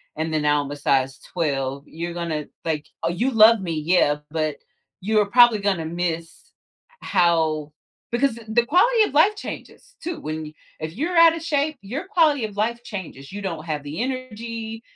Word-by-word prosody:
and 160 +1 -3
then 155 - +1
now 150 0 +3
I'm 140 - -7
a - - -4
size 135 -2 +1
12, 140 -5 -1
you're 170 +2 -5
gonna 165 -3 -3 0.2
like, 155 -2 -2 0.2
oh, 165 - +1
you 235 +10 0
love 225 0 +7
me, 170 -3 -3
yeah, 155 -2 +2
but 155 -2 -1 0.5
you're 210 +2 +2
probably 235 +1 +6
gonna 195 -5 0
miss 170 0 -4 0.5
how 160 -5 +1 0.4
because 240 -1 +1
the 235 +2 +2
quality 440 - +4
of 420 - -2
life 390 +9 +5
changes - - -9
too 340 0 -4
when 155 0 -5 0.3
if 155 +1 -5
you're 320 - -2
out 330 0 +7
of 330 - -7
shape, 300 -1 0
your 270 - -5
quality 315 - +3
of 205 -1 -9
life 235 +3 0
changes. 185 - -8
You 205 +1 -6
don't 165 -4 -4
have 150 -3 -3
the 145 +8 -5
energy, 230 -3 -5
190 Hz, 175 wpm, -23 LUFS, 155-245 Hz, 0.5 s, love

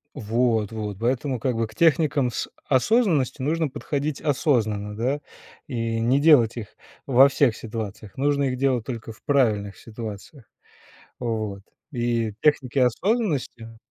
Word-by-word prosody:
Вот 115 -1 0
вот, 105 -3 -5
поэтому, 125 +2 -1
как 125 -3 0
бы, 115 -1 0
к - - -17
техникам 150 -5 +2
с - - -3 0.2
осознанности 145 - +2
нужно 160 +3 0
подходить 145 +2 -3
осознанно, 110 -8 0
да, 130 +6 -1 0.5
и 115 -3 -2
не 130 +5 +2
делать 135 -8 +5
их 110 -3 -8 0.3
во 135 +1 +6
всех 140 -4 +2
ситуациях, 110 -2 -7
нужно 140 +1 +1
их 130 -1 -1
делать 130 -4 +1
только 115 -3 -6
в 110 - -16
правильных 105 -8 +1
ситуациях. 110 +3 -9 0.7
Вот. 110 -5 -3 0.3
И 120 -4 -1
техники 135 -3 +2
осознанности 130 - 0
125 Hz, 135 wpm, -24 LUFS, 110-140 Hz, 0.7 s, во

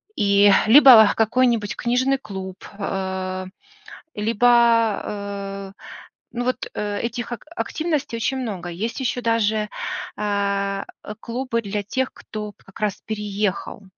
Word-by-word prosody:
И, 200 0 +5 0.2
либо, 230 -4 +9
какой-нибудь 230 -1 +2
книжный 255 +3 +1
клуб. 190 -6 -7 0.2
Э, 190 -1 -3 0.7
либо, 230 +1 +3
э, 200 -1 -6 0.6
ну 245 0 -3
вот, 255 - -1
э, 205 -1 -3
этих 240 +1 -4
ак 240 - -6
активностей 305 -9 -2
очень 265 +3 -1
много. 200 -8 -4
Есть 215 +10 -4
еще 250 -1 -1
даже, 220 -2 +1 0.5
э, 200 -1 -1 0.2
э, 210 - -7
клубы 235 0 -2
для 205 0 -3
тех, 260 +6 -2
кто 215 -1 -7
вот 205 - -14
как 195 - -15
раз 210 -3 -1
переехал. 210 -2 -3
215 Hz, 125 wpm, -22 LUFS, 200-240 Hz, 0.7 s, либо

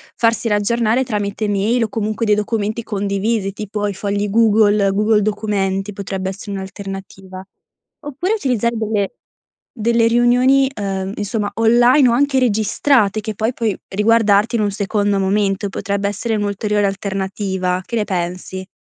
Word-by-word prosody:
farsi 230 0 +1
riaggionare 225 +3 +1
tramite 210 -3 -2
mail 210 +4 +1
o 220 - -2
comunque 215 +1 -2
dei 210 -1 +3
documenti 215 +1 -2
condivisi, 200 0 -1
tipo 205 +1 -4
i 205 - -1
fogli 200 +1 -2
Google, 210 -2 +3
Google 210 +1 +2
documenti, 205 -2 -1
potrebbe 190 -1 -4
essere 195 +1 -7
un'alternativa. 195 -1 -7 0.6
Oppure 295 +8 -2
utilizzare 240 - 0
delle 210 -2 -1 0.6
delle 230 0 +2
riunioni, 250 +3 +4
ehm, 195 -3 -3
insomma, 205 0 -2
online 240 +4 +5
o - - +3
anche 275 +2 +2
registrate 220 -1 +2
che 215 0 -4
poi 220 +4 -1
puoi 225 -5 -1
riguardarti 215 +1 +3
in - - 0
un 205 - +1
secondo 205 0 0
momento, 195 +1 0
potrebbe 200 +1 -2
essere 225 +3 -2
un'ulteriore 205 0 -1
alternativa, 190 -1 -2
che 235 - -4
ne 215 - +1
pensi? 185 0 -4
210 Hz, 140 wpm, -18 LUFS, 195-230 Hz, 0.6 s, online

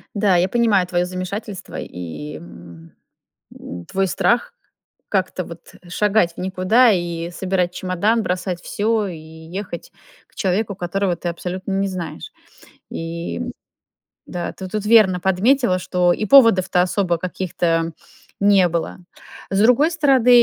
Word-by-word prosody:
Да, 200 -2 +3
я 175 +1 +3
понимаю 220 -5 +3
твоё 175 0 0
замешательство 185 +2 -6
и, 90 - -7
м, 85 - -13 0.7
м, 85 0 -8
твой 195 0 0
страх 195 - +1 0.6
как-то 185 -2 -1
вот 170 0 -12
шагать 200 -1 +2
в - - -10
никуда 190 +6 +3
и 170 -2 -2
собирать 180 -1 -1
чемодан, 195 +6 0
бросать 180 -1 -2
всё 215 +1 0
и 175 -3 -6
ехать 160 +4 -8 0.4
к - - -32
человеку, 200 +1 -1
которого 180 +1 -1
ты 175 +1 -4
абсолютно 180 +3 -5
не 195 +1 +1
знаешь. 175 - -6 0.6
И 170 +5 -5 0.9
да, 175 -1 -4
ты 190 - -7
тут 210 +2 -4
верно 210 -5 +5
подметила, 190 +3 +2
что 180 -1 +2
и 215 - -2
поводов-то 190 -7 +5
особо 180 -1 0
каких-то 170 -2 -1 0.5
не 200 -2 +5
было. 170 0 -3 0.5
С 195 - +1
другой 250 +9 +4
стороны, 275 -7 +3
185 Hz, 130 wpm, -20 LUFS, 175-205 Hz, 0.9 s, верно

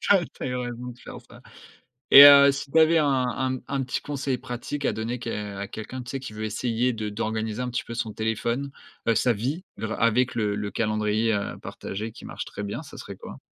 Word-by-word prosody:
tu - - +3
as 180 - +3
tu - - -13
as - - -1
eu 125 - -2
raison 125 0 -4
de 120 - -19
faire - - -10
ça - - -15 0.7
et 140 - +12
heu, 140 -1 +9
si 140 0 -6
tu 160 - +3
avais 160 +1 +6
un 150 - +3
un 130 +1 -1
un 140 -1 -1
petit 130 - -3
conseil 140 -2 -2
pratique 125 +4 -6
à - - +2
donner 115 +3 -3
que 105 -4 -5
à 100 - -4
quelqu'un, 125 +5 -7
tu 125 - -9
sais, 135 - -4
qui 110 -5 -8
veut 110 - -5
essayer 120 +3 0
de 110 -2 -4
d'organiser 110 +2 -3
un 125 - -3
petit 120 - -2
peu 115 - -7
son 110 -2 -3
téléphone, 115 +5 -2 0.4
heu, 115 - +4
sa 120 +2 +3
vie, 135 - -3
grâ 110 0 -3
avec 120 +3 +2
le 105 -3 0
le 105 -1 -3
calendrier, 110 0 0
heu, 100 -1 -2
partagé 110 +3 -6
qui - - -12
marche - - -6
très 100 - -7
bien, 105 +9 -4
ça 145 - -12
serait 100 - -8
quoi? - - -10
120 Hz, 240 wpm, -25 LUFS, 110-130 Hz, 0.7 s, et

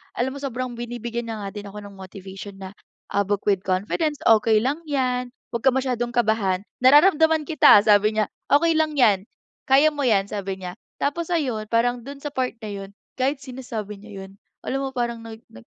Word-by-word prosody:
alam 255 +2 -1
mo - - -7
sobrang 255 -2 -4
binibigyan 235 0 -5
niya 215 -2 -5
nga 200 - -4
din 205 -1 -7
ako 205 +1 -8
ng 200 -1 -11
motivation 190 +1 -10
na, 190 -1 -8 0.4
ah, 200 - +2
book 205 0 -1
with 195 -2 +2
confidence, 215 - -1
"okey 220 0 +5
lang 280 +5 0
yan, 255 -3 0 0.2
'wag 235 - -4
ka 265 - +5
masyadong 250 -2 -1
kabahan 220 -5 +1 0.2
nararamdaman 315 +3 +5
kita" 300 -7 +6
sabi 210 0 +4
niya, 215 -1 0 0.2
"okey 325 +3 +4
lang 310 -1 0
yan, 210 -7 +3 0.4
kaya 280 +4 +5
mo 290 -1 -3
yan" 200 -4 +3
sabi 195 -2 -4
niya. 180 -1 -7 0.3
Tapos 320 +4 -1
ayun 255 -11 -1
parang 245 +2 +1
do'n 275 +2 -9
sa 295 - -4
part 255 -3 -2
na 215 - -5
'yun 195 -1 -7 0.3
kahit 270 +2 +1
sinasabi 235 -6 -7
niya 205 -2 -9
'yun 190 - -12 0.3
alam 270 +1 -2
mo 270 - -2
parang 235 -1 -2
nag 225 -1 -10
nag 115 - -14
235 Hz, 195 wpm, -23 LUFS, 205-270 Hz, 0.4 s, kita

